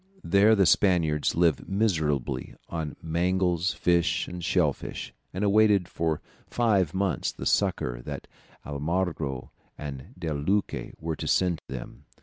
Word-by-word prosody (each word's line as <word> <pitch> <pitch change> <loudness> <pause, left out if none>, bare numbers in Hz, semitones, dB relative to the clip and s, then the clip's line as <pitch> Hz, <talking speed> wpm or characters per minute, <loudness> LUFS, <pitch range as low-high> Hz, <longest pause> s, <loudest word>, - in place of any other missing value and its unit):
There 100 +5 +5
the 100 -2 +4
Spaniards 85 -4 +3
lived 85 -5 +2
miserably 80 - 0
on 80 -3 -4
mangles, 90 +1 +1
fish, 85 -1 +2
and 90 -1 -7
shell 85 -4 +2
fish, - - -7 0.2
and 95 +3 -3
awaited 105 -2 +4
for 80 -2 -1 0.3
five 100 -9 +1
months 95 -1 0
the - - -8
succour - - +1
that - - -6 0.4
Almagro 75 -2 -2 0.3
and 70 -3 -7
De 85 -3 -3
Luque 95 +8 -1
were 80 0 -3
to - - -5
send 90 -4 +2
them. 65 -2 -8
85 Hz, 135 wpm, -27 LUFS, 75-95 Hz, 0.4 s, There